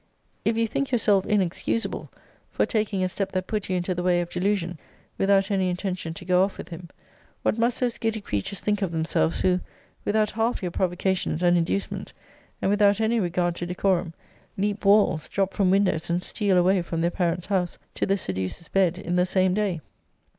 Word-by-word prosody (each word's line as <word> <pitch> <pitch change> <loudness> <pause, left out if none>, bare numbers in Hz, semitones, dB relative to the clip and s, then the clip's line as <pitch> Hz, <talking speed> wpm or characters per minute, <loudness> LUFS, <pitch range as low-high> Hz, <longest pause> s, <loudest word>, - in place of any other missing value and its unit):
If 225 0 +1
you 230 - +3
think 270 +5 -2
yourself 205 -5 +3
inexcusable 205 +3 -1 0.4
for - - +1
taking 210 -4 0
a - - +2
step 190 +1 -3
that 185 -1 -1
put 210 -2 -3
you 185 - +1
into 180 +1 -1
the 180 - -3
way 175 -1 +3
of 175 0 -3
delusion, 180 -3 -1 0.4
without 195 +1 +2
any 190 -2 +2
intention 180 -2 -3
to - - -9
go 180 0 +4
off 195 - -2
with - - -8
him, 170 0 -9 0.5
what 220 - +1
must 235 +2 +1
those 245 -2 -1
giddy 225 -1 -1
creatures 180 - -3
think 210 -1 0
of 190 -4 0
themselves, 160 - 0
who, 180 -1 +3 0.4
without 215 0 +1
half 225 -1 -1
your 180 - -2
provocations 180 -1 0
and 175 0 +5
inducements, 175 +3 -1 0.5
and 195 - +2
without 205 0 +4
any 225 +1 +2
regard 175 -2 0
to 175 - -4
decorum, 180 -2 0 0.4
leap 205 +1 -1
walls, 200 -6 +4
drop 195 -1 0
from 195 -3 +2
windows, 185 -4 +2
and 175 +1 0
steal 200 -2 +1
away 185 +1 +4
from 170 -1 -3
their 170 +1 +1
parents' 175 -1 -1
house, 185 -3 -1 0.2
to - - -1
the 195 - +2
seducer's 95 - -4
bed, 185 -3 +2
in 180 -2 -2
the 180 - +4
same 185 0 +2
day? 195 -5 0
185 Hz, 195 wpm, -25 LUFS, 175-205 Hz, 0.5 s, and